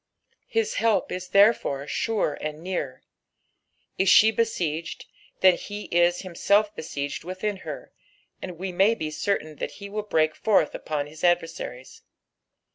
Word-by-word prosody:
His 455 Hz, +1 st, 0 dB
help 225 Hz, -2 st, +2 dB
ia 180 Hz, -, -2 dB
therefore 200 Hz, -9 st, +3 dB
sure 215 Hz, -1 st, -1 dB
and 155 Hz, +1 st, -5 dB
near. 175 Hz, -8 st, -4 dB, 1.0 s
Is 190 Hz, 0 st, +3 dB
she 220 Hz, +1 st, +7 dB
besieged, 175 Hz, -8 st, -2 dB, 0.4 s
then 185 Hz, -1 st, +6 dB
he 205 Hz, 0 st, -7 dB
is 175 Hz, 0 st, +3 dB
himself 200 Hz, +4 st, +1 dB
besieged 145 Hz, -2 st, -5 dB
within 185 Hz, +4 st, -3 dB
her, -, -, -8 dB, 0.5 s
and 180 Hz, -2 st, -7 dB
we 190 Hz, +2 st, -4 dB
may 195 Hz, +5 st, +3 dB
be 155 Hz, -7 st, -4 dB
certain 155 Hz, -3 st, -2 dB
that -, -, -4 dB
he 200 Hz, 0 st, -9 dB
will 210 Hz, +1 st, -3 dB
brenk 155 Hz, -6 st, +1 dB
forth 215 Hz, +5 st, +2 dB
upon 150 Hz, -2 st, -3 dB
his 155 Hz, +2 st, -12 dB
adversaries. 165 Hz, -7 st, -1 dB
185 Hz, 140 wpm, -25 LUFS, 155-205 Hz, 1.0 s, she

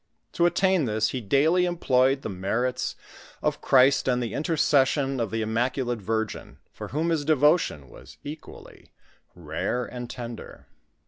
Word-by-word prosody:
To 175 Hz, -, +3 dB
attain 180 Hz, -2 st, +2 dB
this 110 Hz, -1 st, 0 dB
he 130 Hz, -, -4 dB
daily 155 Hz, -, +3 dB
employed 135 Hz, -6 st, +1 dB
the -, -, -3 dB
merits 115 Hz, +7 st, -2 dB, 0.5 s
of -, -, -1 dB
Christ 135 Hz, +1 st, +4 dB
and 125 Hz, -1 st, +2 dB
the 120 Hz, -3 st, -3 dB
intercession 145 Hz, -3 st, +1 dB
of 115 Hz, -3 st, -1 dB
the 110 Hz, +1 st, -2 dB
Immaculate 120 Hz, +2 st, -1 dB
Virgin, 110 Hz, +2 st, -3 dB
for -, -, -8 dB
whom 160 Hz, +4 st, -1 dB
his 160 Hz, -3 st, 0 dB
devotion 150 Hz, -, +2 dB
was 65 Hz, +4 st, -15 dB
equally 150 Hz, +2 st, -11 dB, 0.4 s
rare 125 Hz, 0 st, -3 dB
and 120 Hz, -1 st, -7 dB
tender. 120 Hz, -2 st, -8 dB
130 Hz, 140 wpm, -25 LUFS, 115-150 Hz, 0.5 s, Christ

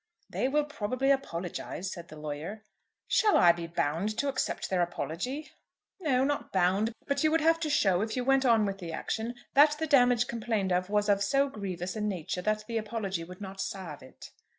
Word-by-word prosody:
"They -, -, 0 dB
will 295 Hz, +2 st, +2 dB
probably 260 Hz, 0 st, 0 dB
apologise," 185 Hz, -6 st, -3 dB
said 170 Hz, -1 st, -9 dB
the 155 Hz, -, -11 dB
lawyer. 155 Hz, +8 st, -6 dB, 0.4 s
"Shall 425 Hz, -3 st, +4 dB
I 175 Hz, -, +7 dB
be 170 Hz, 0 st, -5 dB
bound 170 Hz, +6 st, -1 dB
to 280 Hz, -, +1 dB
accept 265 Hz, -1 st, -2 dB
their 185 Hz, -2 st, +1 dB
apology?" 190 Hz, -, -3 dB, 0.5 s
"No; 270 Hz, -8 st, +2 dB
not 290 Hz, +1 st, -1 dB
bound; 190 Hz, +4 st, +2 dB
but 280 Hz, +1 st, 0 dB
you 310 Hz, -, +5 dB
would 325 Hz, +1 st, +2 dB
have 330 Hz, +1 st, +4 dB
to 315 Hz, -2 st, -2 dB
show, 195 Hz, -10 st, +3 dB
if 220 Hz, +1 st, -2 dB
you 250 Hz, -, -1 dB
went 270 Hz, 0 st, +4 dB
on 230 Hz, -4 st, +4 dB
with 195 Hz, -1 st, -3 dB
the 170 Hz, -3 st, -6 dB
action, 225 Hz, +8 st, -3 dB, 0.2 s
that 295 Hz, +2 st, +6 dB
the 320 Hz, -, -1 dB
damage 245 Hz, -5 st, +4 dB
complained 220 Hz, -5 st, -1 dB
of 180 Hz, +1 st, +1 dB
was 210 Hz, 0 st, +1 dB
of 200 Hz, -1 st, +3 dB
so 275 Hz, +7 st, +2 dB
grievous 190 Hz, -5 st, -5 dB
a 215 Hz, -, -3 dB
nature 185 Hz, -4 st, -2 dB
that 215 Hz, +2 st, -1 dB
the 230 Hz, 0 st, -2 dB
apology 210 Hz, -5 st, -3 dB
would 180 Hz, +3 st, -11 dB
not 195 Hz, -1 st, -6 dB
salve 180 Hz, -7 st, -5 dB
it." 130 Hz, -, -13 dB
210 Hz, 200 wpm, -29 LUFS, 180-265 Hz, 0.5 s, I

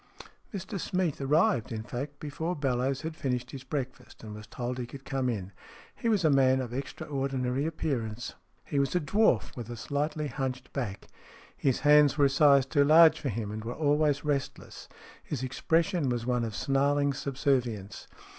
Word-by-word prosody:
Mr 195 Hz, 0 st, -5 dB
Smeath 180 Hz, -6 st, -1 dB
arrived, 135 Hz, -4 st, +2 dB
in 110 Hz, -1 st, -4 dB
fact, 140 Hz, +5 st, -6 dB
before 160 Hz, +4 st, -3 dB
Bellowes 135 Hz, -1 st, 0 dB
had 160 Hz, 0 st, -5 dB
finished 125 Hz, -5 st, -2 dB
his 135 Hz, -2 st, -8 dB
breakfast, 130 Hz, -3 st, -6 dB
and 110 Hz, -1 st, -7 dB
was 105 Hz, +1 st, -10 dB
told 125 Hz, +1 st, -4 dB
he 120 Hz, -, -4 dB
could 135 Hz, +2 st, -11 dB
come 135 Hz, -2 st, -1 dB
in. 100 Hz, -5 st, -4 dB, 0.4 s
He 230 Hz, -, -1 dB
was 205 Hz, -6 st, +2 dB
a 155 Hz, -, +5 dB
man 130 Hz, -1 st, +4 dB
of 125 Hz, -2 st, -4 dB
extraordinary 135 Hz, 0 st, -2 dB
appearance, 125 Hz, -8 st, -3 dB
STORIES -, -, -5 dB
IN 90 Hz, +1 st, -35 dB
GREY -, -, -22 dB
He 140 Hz, -, +3 dB
was 140 Hz, +4 st, 0 dB
a -, -, +4 dB
dwarf, 175 Hz, -, +2 dB
with 120 Hz, -2 st, -7 dB
a 120 Hz, -, -6 dB
slightly 150 Hz, +4 st, -2 dB
hunched 130 Hz, -2 st, -4 dB
back. 105 Hz, -8 st, -4 dB, 0.5 s
His 135 Hz, -3 st, 0 dB
hands 150 Hz, -1 st, +5 dB
were 145 Hz, -, +5 dB
a -, -, +4 dB
size 140 Hz, -1 st, +5 dB
too 140 Hz, +1 st, +3 dB
large 160 Hz, +2 st, +7 dB
for 140 Hz, -, -2 dB
him, 110 Hz, -2 st, -3 dB
and 110 Hz, 0 st, -5 dB
were 120 Hz, +2 st, -5 dB
always 150 Hz, -1 st, +1 dB
restless. 140 Hz, -2 st, -3 dB, 0.3 s
His 135 Hz, -4 st, -4 dB
expression 165 Hz, +4 st, +1 dB
was 120 Hz, -2 st, -2 dB
one 125 Hz, -1 st, +1 dB
of 110 Hz, -2 st, -5 dB
snarling 140 Hz, +2 st, +1 dB
subservience. 125 Hz, -7 st, -2 dB
135 Hz, 185 wpm, -29 LUFS, 125-150 Hz, 0.5 s, large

